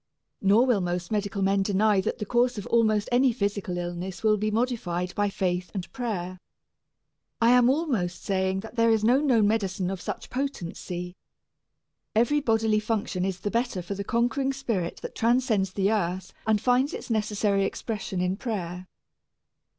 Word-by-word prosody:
Nor 205 Hz, +5 st, +5 dB
will 240 Hz, -6 st, +2 dB
most 175 Hz, 0 st, -3 dB
medical 200 Hz, -2 st, -1 dB
men 195 Hz, +1 st, +2 dB
deny 205 Hz, +1 st, +3 dB
that -, -, -2 dB
the 210 Hz, -, -4 dB
course 245 Hz, +2 st, +2 dB
of 205 Hz, -, -5 dB
almost 220 Hz, -3 st, +2 dB
any 250 Hz, +1 st, +4 dB
physical 200 Hz, -5 st, -2 dB
illness 175 Hz, +2 st, -5 dB
may 215 Hz, -1 st, +4 dB
be 215 Hz, +1 st, -1 dB
modified 210 Hz, -7 st, -1 dB
by 205 Hz, 0 st, +1 dB
faith 180 Hz, -2 st, -1 dB
and 185 Hz, -2 st, -5 dB
prayer. 185 Hz, -7 st, -4 dB, 1.0 s
I 230 Hz, +1 st, +5 dB
am 250 Hz, 0 st, +6 dB
almost 255 Hz, -, -1 dB
saying 190 Hz, -1 st, 0 dB
that 225 Hz, +3 st, -11 dB
there 230 Hz, 0 st, +4 dB
is 220 Hz, -1 st, +3 dB
no 250 Hz, +5 st, +4 dB
known 240 Hz, -8 st, +3 dB
medicine 195 Hz, -4 st, 0 dB
of 190 Hz, -2 st, -5 dB
such -, -, -6 dB
potency. 180 Hz, -9 st, -4 dB, 1.0 s
Every 240 Hz, +7 st, +3 dB
bodily 225 Hz, -4 st, +2 dB
function 210 Hz, -4 st, -2 dB
is 190 Hz, -1 st, -2 dB
the 205 Hz, -, -2 dB
better 235 Hz, -6 st, -1 dB
for 190 Hz, -, -4 dB
the 200 Hz, 0 st, -4 dB
conquering 245 Hz, +5 st, 0 dB
spirit 230 Hz, -10 st, -2 dB
that -, -, -6 dB
transcends 230 Hz, -5 st, +1 dB
the 195 Hz, +1 st, +1 dB
earth 185 Hz, -3 st, -1 dB
and 215 Hz, -1 st, +3 dB
finds 250 Hz, +5 st, +2 dB
its -, -, -7 dB
necessary 210 Hz, -2 st, +1 dB
expression 200 Hz, -3 st, -3 dB
in 180 Hz, +1 st, 0 dB
prayer. 185 Hz, -7 st, -4 dB
210 Hz, 165 wpm, -26 LUFS, 185-235 Hz, 1.0 s, am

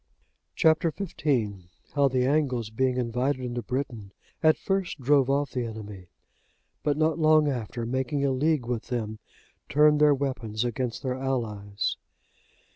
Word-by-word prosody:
Chap. 160 Hz, -1 st, +4 dB
XV. 175 Hz, +2 st, -3 dB, 0.8 s
How 140 Hz, -1 st, +4 dB
the 130 Hz, -1 st, +1 dB
Angles, 130 Hz, -6 st, 0 dB
being 130 Hz, +2 st, 0 dB
invited 125 Hz, +2 st, -1 dB
into 120 Hz, 0 st, -3 dB
Britain, 120 Hz, -6 st, -4 dB, 0.3 s
at 155 Hz, -1 st, +5 dB
first 195 Hz, -5 st, -2 dB
drove 135 Hz, 0 st, +3 dB
off 140 Hz, 0 st, +1 dB
the 125 Hz, -, -2 dB
enemy; 105 Hz, -5 st, -8 dB, 0.7 s
but 145 Hz, -1 st, 0 dB
not 160 Hz, +1 st, +1 dB
long 155 Hz, -1 st, +5 dB
after, 120 Hz, -3 st, -3 dB
making 130 Hz, +3 st, -1 dB
a 135 Hz, -, +2 dB
league 145 Hz, 0 st, +1 dB
with 120 Hz, -2 st, -3 dB
them, 110 Hz, -3 st, -3 dB, 0.5 s
turned 150 Hz, +1 st, +4 dB
their 150 Hz, -1 st, +6 dB
weapons 125 Hz, -5 st, -2 dB
against 120 Hz, +2 st, -3 dB
their 130 Hz, -2 st, -1 dB
allies. 110 Hz, -6 st, -2 dB
130 Hz, 140 wpm, -27 LUFS, 120-145 Hz, 0.8 s, their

